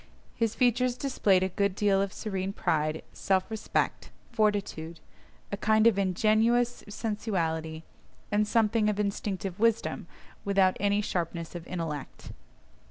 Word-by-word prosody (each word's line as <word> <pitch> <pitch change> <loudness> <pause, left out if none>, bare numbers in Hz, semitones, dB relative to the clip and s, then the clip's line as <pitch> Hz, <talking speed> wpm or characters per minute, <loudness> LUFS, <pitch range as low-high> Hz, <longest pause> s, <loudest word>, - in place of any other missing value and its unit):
His 225 -2 -1
features 250 0 +2
displayed 205 -9 +2
a 190 - 0
good 200 0 0
deal 200 -2 +2
of 200 -1 -1
serene 195 -2 -3
pride, 155 -4 0
self 190 +2 0
respect, 220 -1 -1 0.2
fortitude, 205 -7 -1 0.5
a 200 - -2
kind 220 +1 +3
of 220 -4 +5
ingenuous 220 +5 +2
sensuality, 165 -8 -2 0.5
and 210 0 +2
something 220 -1 +2
of 210 -1 -2
instinctive 200 -2 -2
wisdom, 230 0 +1 0.4
without 195 -2 +3
any 205 +1 +2
sharpness 170 -4 -3
of 175 -1 -8
intellect. 160 -6 -5
200 Hz, 125 wpm, -28 LUFS, 185-220 Hz, 0.5 s, of